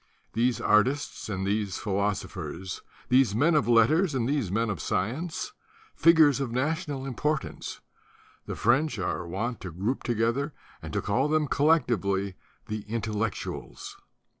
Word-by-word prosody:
These 120 0 +1
artists 125 +5 +1
and 95 -2 -2
these 100 -1 -1
phi 105 - -4
losophers, 95 -3 -3 0.3
these 125 -5 +4
men 155 +9 +3
of 150 -5 +3
letters 140 - +4
and 120 -3 0
these 135 -9 0
men 115 +2 +1
of 85 -7 -4
science, 155 - -2 0.4
figures 160 -5 +6
of 135 -4 -2
national 145 +1 -1
importance, 135 +2 -3 0.7
the - - -3
French 135 +3 +2
are 90 -2 -2
wont 110 +7 -3
to 95 - -5
group 100 +10 -2
together 120 +6 0 0.3
and - - -7
to - - -1
call 135 +4 +1
them 155 0 +2
collectively 105 - +2 0.3
The 105 0 -4
Intellectuals. 110 0 -4
120 Hz, 140 wpm, -27 LUFS, 105-145 Hz, 0.7 s, figures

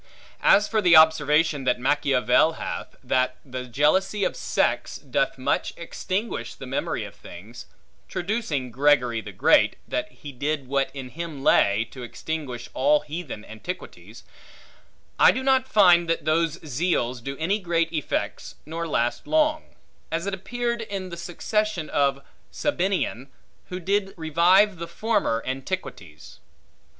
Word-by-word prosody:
As 210 +1 +5
for 220 -1 +1
the 175 -3 +6
observation 155 -1 +4
that 125 - +2
Machiavel 135 +2 +3
hath, - - -6
that 130 0 +1
the 130 -1 -6
jealousy 190 - +1
of - - 0
sects, - - -1
doth - - -1
much - - -1
extinguish 200 +5 -4
the - - -9
memory - - -2
of - - -9
things; - - -12 0.4
traducing 175 - -2
Gregory 125 -3 +2
the 105 - -9
Great, 90 - +4
that - - -3
he 145 - -10
did 140 +1 -3
what 135 0 0
in 130 -2 -6
him 160 -2 -7
lay, 105 -1 +3
to 130 - -10
extinguish 130 0 -5
all 145 +3 +3
heathen 150 -7 -7
antiquities; 110 +12 -9 1.0
I - - +8
do 260 - -3
not 265 -1 +3
find 175 -7 +5
that 165 - -1
those 165 +1 +1
zeals 130 -5 -1
do 135 +1 -5
any 190 +7 0
great 170 -3 0
effects, 155 -3 -3
nor 165 +2 -4
last 120 -5 -1
long; 310 0 +2 0.5
as 165 +2 -2
it 200 - -2
appeared 235 +4 -3
in 195 -4 -5
the 170 - -6
succession 180 +1 -2
of 140 -1 +1 0.3
Sabinian, 185 - -1 0.4
who 180 - -4
did 195 +2 -1
revive 175 +5 +3
the 170 - -5
former 200 - 0
antiquities. 130 - -6
160 Hz, 140 wpm, -24 LUFS, 135-190 Hz, 1.0 s, I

